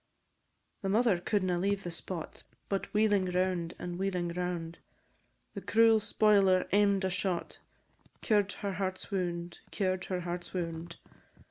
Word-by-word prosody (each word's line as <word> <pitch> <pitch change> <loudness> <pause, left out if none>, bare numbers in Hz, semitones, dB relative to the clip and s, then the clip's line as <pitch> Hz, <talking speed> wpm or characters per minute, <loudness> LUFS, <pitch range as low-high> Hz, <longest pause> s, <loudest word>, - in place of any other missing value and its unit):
The 195 - -2
mother 215 -2 +3
cou'dna 185 -2 0
leave 200 +1 0
the 175 - -4
spot, 165 0 -5 0.3
But 195 -1 -2
wheeling 210 -2 +3
round, 180 -2 0
and 175 0 -5
wheeling 180 -3 -1
round, 170 -1 -3 0.7
The - - -6
cruel 225 0 +5
spoiler 205 -3 +3
aim'd 200 -1 +3
a - - +1
shot, 180 0 -2 0.6
Cured 205 -3 +2
her 200 -2 -4
heart's 185 +1 -3
wound, 175 -2 -3
cured 185 -2 -1
her 180 -1 -2
heart's 175 +1 -5
wound. 170 -1 -4
185 Hz, 135 wpm, -31 LUFS, 175-200 Hz, 0.7 s, cruel